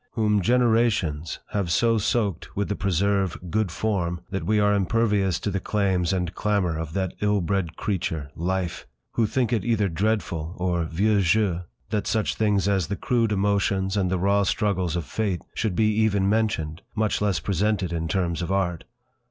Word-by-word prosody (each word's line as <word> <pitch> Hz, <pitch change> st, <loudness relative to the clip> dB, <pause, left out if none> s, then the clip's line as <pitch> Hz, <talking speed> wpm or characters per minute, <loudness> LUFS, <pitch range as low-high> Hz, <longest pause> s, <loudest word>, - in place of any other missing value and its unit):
Whom 105 Hz, -3 st, +2 dB
generations 110 Hz, -9 st, +2 dB
have 100 Hz, -4 st, -1 dB
so 115 Hz, +6 st, +3 dB
soaked 100 Hz, -4 st, -1 dB
with 100 Hz, -, -1 dB
the 105 Hz, -, 0 dB
preserve 100 Hz, -1 st, +1 dB
"good 110 Hz, -4 st, 0 dB
form" 90 Hz, -2 st, -1 dB
that 95 Hz, -, -2 dB
we 105 Hz, 0 st, +3 dB
are 105 Hz, 0 st, +3 dB
impervious 100 Hz, -2 st, +1 dB
to 100 Hz, -, -1 dB
the 100 Hz, -, -1 dB
claims 95 Hz, -4 st, 0 dB
and 90 Hz, -2 st, -1 dB
clamour 100 Hz, -6 st, 0 dB
of 80 Hz, -1 st, -5 dB
that 95 Hz, -1 st, -1 dB
ill 105 Hz, 0 st, +2 dB
bred 90 Hz, -2 st, -1 dB
creature—life! 85 Hz, 0 st, -3 dB, 0.2 s
Who 115 Hz, -2 st, +1 dB
think 125 Hz, 0 st, 0 dB
it 110 Hz, -, +1 dB
either 110 Hz, -4 st, +1 dB
dreadful, 90 Hz, -3 st, -1 dB
or 90 Hz, -2 st, 0 dB
'vieux 100 Hz, +6 st, +2 dB
jeu', 95 Hz, -1 st, +2 dB, 0.3 s
that 105 Hz, -2 st, -1 dB
such 110 Hz, -2 st, +1 dB
things 105 Hz, -3 st, +1 dB
as 95 Hz, -5 st, +1 dB
the 100 Hz, -, -2 dB
crude 115 Hz, +1 st, 0 dB
emotions 100 Hz, -1 st, +1 dB
and 95 Hz, -3 st, +1 dB
the 95 Hz, -, 0 dB
raw 100 Hz, +3 st, +2 dB
struggles 95 Hz, -4 st, 0 dB
of 85 Hz, -3 st, -2 dB
Fate 100 Hz, -2 st, -2 dB
should 110 Hz, -5 st, -1 dB
be 110 Hz, +1 st, +3 dB
even 100 Hz, -3 st, +2 dB
mentioned, 100 Hz, -7 st, 0 dB
much 110 Hz, -1 st, 0 dB
less 100 Hz, -4 st, +1 dB
presented 100 Hz, -1 st, 0 dB
in 80 Hz, -1 st, -2 dB
terms 85 Hz, -1 st, -1 dB
of 85 Hz, -, -3 dB
art! 90 Hz, -4 st, -1 dB
100 Hz, 175 wpm, -25 LUFS, 90-105 Hz, 0.3 s, so